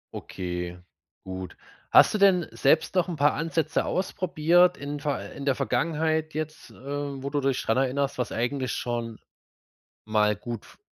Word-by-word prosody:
Okay, 90 -1 -5 0.5
gut. 95 -1 -7 0.3
Hast - - +7
du 215 - 0
denn 185 -4 +5
selbst 160 +3 +2
noch 180 -1 +2
n' 170 - -3
paar 145 0 +3
Ansätze 165 -1 0
ausprobiert 175 -1 +2
in 145 +1 -5
ver 145 -1 -3
äh, - - -15
in 140 - -7
der 140 - +2
Vergangenheit 155 +4 0
jetzt, 155 0 -5
äh, - - -16
wo 140 0 -5
du 145 - 0
dich 135 -1 +1
dran 115 - +1
erinnerst, 135 +1 0
was 125 - -1
eigentlich 130 +2 -1
schon 120 -2 -3 0.9
mal 105 -1 +2
gut 115 0 -6
f - - -18
140 Hz, 165 wpm, -26 LUFS, 120-160 Hz, 0.9 s, Hast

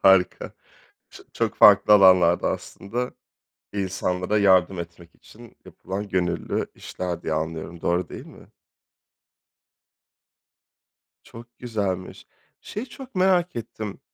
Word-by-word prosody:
Harika. 95 -1 +3 0.6
Ç - - -13
çok - - -1
farklı 105 +1 +7
alanlarda 90 -3 +5
aslında, 120 +5 -5 0.6
insanlara 95 0 -1
yardım 95 -2 +3
etmek 85 0 -10
için 115 +1 -17
yapılan 100 +2 -6
gönüllü 90 -3 -1
işler 90 -2 -5
diye 80 - -2
anlıyorum. 80 +2 -4
Doğru 90 +1 0
değil - - -9
mi? - - -15 2.8
Çok 120 +1 -14
güzelmiş. 100 -6 -4 0.3
Şeyi 215 +5 -6
çok 265 +1 -12
merak 185 -4 +2
ettim: 110 -3 -6
95 Hz, 100 wpm, -24 LUFS, 90-115 Hz, 2.8 s, farklı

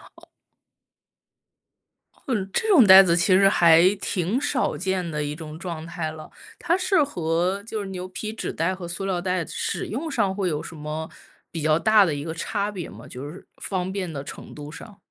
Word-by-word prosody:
哦。 - - -19 2.0
哦， 260 - -1 0.2
这 445 - 0
种 320 - +7
袋 190 0 +10
子 170 -1 +2
其 185 +2 +4
实 195 +1 +6
还 170 +1 +6
挺 190 +4 -1
少 255 - -1
见 185 0 -2
的 150 -1 -2
一 145 0 -4
种 155 -1 -9
状 170 -3 -6
态 170 -2 -4
了。 155 -1 -10 0.3
它 345 +2 +1
是 370 -4 +3
和 180 - -1
就 220 -1 -5
是 195 - -6
牛 185 -1 -6
皮 215 +4 -6
纸 225 - -5
袋 165 +4 0
和 180 -2 -7
塑 175 +3 -5
料 185 -2 -1
袋 180 -1 -1
使 - - -3
用 290 +9 -4
上 205 -8 0
会 195 -1 -1
有 150 -3 -1
什 - - -9
么 155 +1 -5 0.4
比 165 - -5
较 155 +1 +3
大 215 +1 +5
的 160 - -1
一 145 - -5
个 160 0 -4
差 200 +4 -2
别 180 -5 -6
吗？ - - -12
就 130 +3 -8
是 175 +5 -12
方 185 -1 -3
便 190 -4 -3
的 140 -2 -5
程 - - -10
度 150 0 -8
上。 195 +5 -12
180 Hz, 220 characters per minute, -24 LUFS, 160-200 Hz, 2.0 s, 袋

